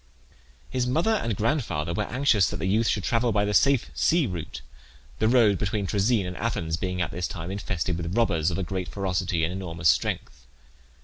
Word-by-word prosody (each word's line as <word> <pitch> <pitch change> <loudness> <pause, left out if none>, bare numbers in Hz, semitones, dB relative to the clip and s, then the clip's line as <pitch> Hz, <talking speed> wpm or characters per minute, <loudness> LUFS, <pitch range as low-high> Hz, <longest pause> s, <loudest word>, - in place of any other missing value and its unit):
His 125 -1 -1
mother 165 - +1
and 115 - 0
grandfather 110 - -1
were 105 +4 -1
anxious 115 - +3
that - - -4
the - - -3
youth 110 +4 +2
should 100 - 0
travel 120 +2 +1
by 105 -1 +2
the 105 - -1
safe 135 +2 +3
sea 170 -2 +2
route, 85 - -6 0.6
the 110 - +3
road 110 -5 +4
between 100 0 -1
Troezen 100 +2 +1
and 90 0 -5
Athens 85 -8 -1
being 90 +1 -2
at - - -4
this 90 -1 -2
time 85 0 -6
infested 95 -3 -2
with 85 +2 -4
robbers 85 -9 +2
of 95 +1 -2
great 95 0 -3
ferocity 95 -3 -1
and 85 +2 -1
enormous 85 -3 0
strength. 60 0 -1
95 Hz, 190 wpm, -26 LUFS, 85-115 Hz, 0.6 s, road